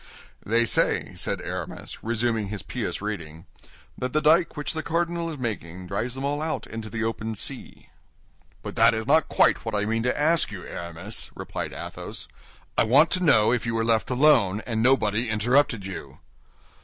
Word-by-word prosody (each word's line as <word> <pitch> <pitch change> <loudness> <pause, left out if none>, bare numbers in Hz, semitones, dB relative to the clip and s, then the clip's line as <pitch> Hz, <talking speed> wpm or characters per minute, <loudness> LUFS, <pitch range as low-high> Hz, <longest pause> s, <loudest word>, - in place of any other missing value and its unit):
"They 115 +2 +2
say," 110 - +1
said - - -2
Aramis, - - -6
resuming 115 -2 0
his 100 -1 -5
pious - - -4
reading, 85 -6 -5 0.5
"that 125 0 -4
the 155 - +3
dyke 160 +2 +3
which 145 - -2
the 160 - -2
cardinal 170 +1 -1
is 155 - -6
making 95 -8 -5
drives 110 +7 -3
them 135 - -5
all 145 +1 -1
out 160 0 -2
into 115 -1 -7
the 115 +1 -3
open 110 0 -3
sea." - - -4 0.7
"But - - -6
that - - +6
is 110 0 -3
not 155 +4 +3
quite - - +3
what - - -3
I 105 0 0
mean 115 +1 0
to 125 +4 0
ask 160 -1 +3
you, 95 -3 -7
Aramis," 85 +5 -5
replied - - -5
Athos. - - -7 0.5
"I - - +6
want 140 +9 +5
to 185 - +1
know 110 -9 +5
if 120 -1 -1
you 115 - -1
were 115 0 +1
left 115 -1 +1
alone, 125 -7 +4
and 115 -3 -1
nobody 120 -2 +2
interrupted 115 0 +2
you." 95 -2 -7
115 Hz, 180 wpm, -25 LUFS, 105-145 Hz, 0.7 s, that